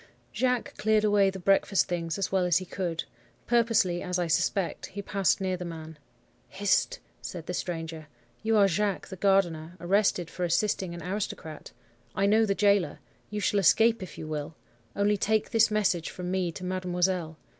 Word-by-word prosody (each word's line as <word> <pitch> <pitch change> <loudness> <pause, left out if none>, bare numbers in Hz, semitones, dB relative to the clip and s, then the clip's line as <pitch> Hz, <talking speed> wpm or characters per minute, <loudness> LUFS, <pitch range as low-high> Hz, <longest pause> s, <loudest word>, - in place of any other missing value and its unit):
"Jacques 250 -2 0
cleared 215 0 +2
away 205 -2 +4
the 190 - -6
breakfast 195 +1 +2
things 165 -2 -2
as 195 - -2
well 190 -1 +2
as 175 -2 +3
he 185 - -3
could. 175 -2 -3 0.4
Purposely, 230 -7 +2
as 180 -1 -2
I 175 - 0
suspect, 170 +3 0
he 200 +2 -6
passed 195 -2 +1
near 190 -1 -1
the 180 - -6
man. 160 -2 -8 0.5
"'Hist!' - - +1 0.2
said 170 -3 -7
the 180 - -4
stranger. 165 -3 -4 0.3
'You 220 0 +2
are 200 -1 +6
Jacques, 200 +2 -1
the 190 - -6
gardener, 180 -3 +1
arrested 185 -1 +1
for 180 - -4
assisting 175 0 0
an 170 - -8
aristocrat. 180 -5 -5 0.5
I 195 - +2
know 220 +2 +4
the 195 - +1
gaoler. 200 -7 +2 0.3
You 210 0 -4
shall 205 - +2
escape, 225 +5 +4
if 185 - -8
you - - -6
will. 155 0 -4 0.4
Only 205 +1 +2
take 215 +2 0
this 225 -2 +4
message 200 -6 +1
from 180 0 -5
me 185 -2 0
to 185 - -9
mademoiselle. 180 -2 -1
185 Hz, 175 wpm, -28 LUFS, 170-205 Hz, 0.5 s, are